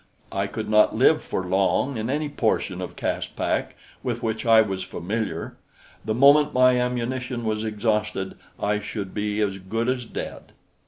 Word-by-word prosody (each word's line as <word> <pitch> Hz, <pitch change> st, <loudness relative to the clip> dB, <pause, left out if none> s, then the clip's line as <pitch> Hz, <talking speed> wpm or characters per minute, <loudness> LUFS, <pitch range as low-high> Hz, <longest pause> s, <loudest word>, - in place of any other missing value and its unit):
I 100 Hz, 0 st, -1 dB
could 110 Hz, +2 st, -5 dB
not 105 Hz, 0 st, +4 dB
live -, -, +4 dB
for 95 Hz, -, -3 dB
long 95 Hz, +8 st, +1 dB
in 110 Hz, +1 st, -3 dB
any 150 Hz, +3 st, 0 dB
portion 110 Hz, -8 st, -1 dB
of 90 Hz, -, -6 dB
Caspak -, -, -2 dB, 0.3 s
with -, -, -3 dB
which 110 Hz, +1 st, -2 dB
I 115 Hz, -1 st, +8 dB
was 95 Hz, -3 st, -3 dB
familiar; 95 Hz, -2 st, -4 dB, 0.5 s
the 110 Hz, 0 st, -1 dB
moment 145 Hz, +3 st, +6 dB
my 125 Hz, -1 st, +5 dB
ammunition 125 Hz, 0 st, -2 dB
was 110 Hz, 0 st, -1 dB
exhausted, 105 Hz, -2 st, -1 dB, 0.3 s
I 105 Hz, 0 st, +1 dB
should 100 Hz, -2 st, -5 dB
be 105 Hz, 0 st, -1 dB
as 100 Hz, -2 st, -1 dB
good 115 Hz, +5 st, -2 dB
as 125 Hz, -1 st, -1 dB
dead. -, -, -7 dB
110 Hz, 160 wpm, -24 LUFS, 100-125 Hz, 0.5 s, I